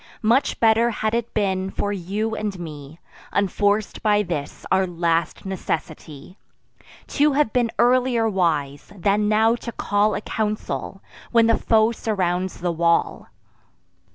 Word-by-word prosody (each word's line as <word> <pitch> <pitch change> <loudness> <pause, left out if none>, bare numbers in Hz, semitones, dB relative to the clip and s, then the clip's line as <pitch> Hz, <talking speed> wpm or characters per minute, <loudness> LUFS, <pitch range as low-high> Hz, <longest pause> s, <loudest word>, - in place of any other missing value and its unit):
Much 240 +6 +2
better 225 +1 +4
had 215 -1 -2
it 235 0 -1
been 190 -3 0
for 205 +1 -2
you 205 +4 -3
and 210 -3 -3
me, 155 -1 -9 0.3
Unforc'd 205 +1 0
by 210 -1 +3
this 160 -6 -5
our 190 0 +3
last 170 -1 -1
necessity, 165 -3 -5 0.7
To 295 0 +2
have 275 -6 +1
been 240 -2 +2
earlier 245 -2 +3
wise, 155 -8 -1
than 205 +3 +1
now 220 +2 +4
to 235 - -7
call 210 -1 +1
A - - -3
council, 210 -2 -4 0.3
when 230 -1 +5
the 230 0 +4
foe 220 0 +3
surrounds 185 -6 -2
the 175 -1 0
wall. 170 0 0
205 Hz, 135 wpm, -22 LUFS, 175-225 Hz, 0.7 s, when